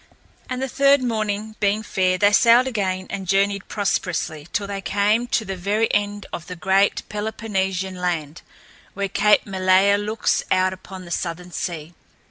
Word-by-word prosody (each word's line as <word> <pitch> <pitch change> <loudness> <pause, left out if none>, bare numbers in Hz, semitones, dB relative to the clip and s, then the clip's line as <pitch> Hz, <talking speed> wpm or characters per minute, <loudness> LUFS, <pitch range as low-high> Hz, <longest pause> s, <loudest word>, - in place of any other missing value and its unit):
And 255 +1 -3
the - - -1
third 275 +1 +3
morning 215 -2 -2
being 210 +1 +1
fair, 185 -3 +1
they 205 +2 +4
sailed 235 +4 +6
again 190 -7 -2
and 195 -2 -5
journeyed 200 +1 +1
prosperously 170 -6 -2
till 205 - -1
they 200 -1 -5
came 210 +5 +1
to 230 -2 0
the 195 -1 -4
very 205 +5 0
end 205 0 -1
of 170 - -6
the 180 - -6
great 190 +4 +2
Peloponnesian 195 -3 -2
land, 170 -4 -3 0.5
where 200 0 -1
Cape 210 +2 +3
Malea 190 +1 +3
looks 215 +1 0
out 185 0 +2
upon 185 0 -10
the 170 - -11
southern 175 +1 -4
sea. 170 -2 -5
200 Hz, 160 wpm, -22 LUFS, 185-210 Hz, 0.5 s, sailed